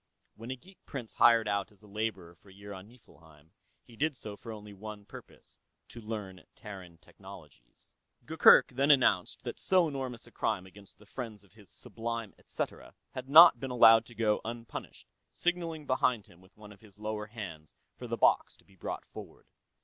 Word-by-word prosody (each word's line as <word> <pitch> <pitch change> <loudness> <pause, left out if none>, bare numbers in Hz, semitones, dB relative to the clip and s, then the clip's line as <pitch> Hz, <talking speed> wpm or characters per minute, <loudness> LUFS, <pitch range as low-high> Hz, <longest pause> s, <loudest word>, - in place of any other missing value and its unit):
When 115 +2 -10
a 130 - -3
geek 185 +8 -20
prince 125 -6 -7
hired 115 -2 +5
out 100 +1 -1
as 105 0 -22
a - - -15
laborer 100 -4 -4
for 85 +4 -22
a - - -15
year 100 +1 -10
on 95 +1 -10
Niflheim, 80 -10 -21 0.3
he 115 - -17
did 150 +2 -1
so 105 -3 -8
for 115 +2 -10
only 105 -1 -10
one 105 +1 -9
purpose - - -14 0.3
to 120 - -10
learn 105 -4 -7
Terran 95 -5 -10
technologies. - - -16 0.3
Gurgurk - - +6
then 135 +3 0
announced 120 -10 +3
that - - -6
so 185 -3 +3
enormous 130 -5 -5
a - - -17
crime 95 - -2
against 100 +1 -16
the 105 - -19
friends 110 -2 -8
of 100 - -25
His 105 -3 -18
Sublime 115 -2 -6
etcetera - - -6 0.2
had 130 +1 -8
not 155 -4 +9
been 135 +1 -5
allowed 115 -2 +6
to 120 - -15
go 110 -1 +1
unpunished, 115 0 -8 0.2
signaling 170 -3 -2
behind 125 -5 +1
him 85 - -20
with 95 +2 -23
one 105 -1 -13
of 100 - -16
his 105 -3 -18
lower 105 0 -4
hands 90 -9 -9 0.2
for - - -9
the - - -3
box - - +3
to - - -26
be 95 - -23
brought - - -6
forward. - - -12
110 Hz, 190 wpm, -30 LUFS, 100-120 Hz, 0.3 s, not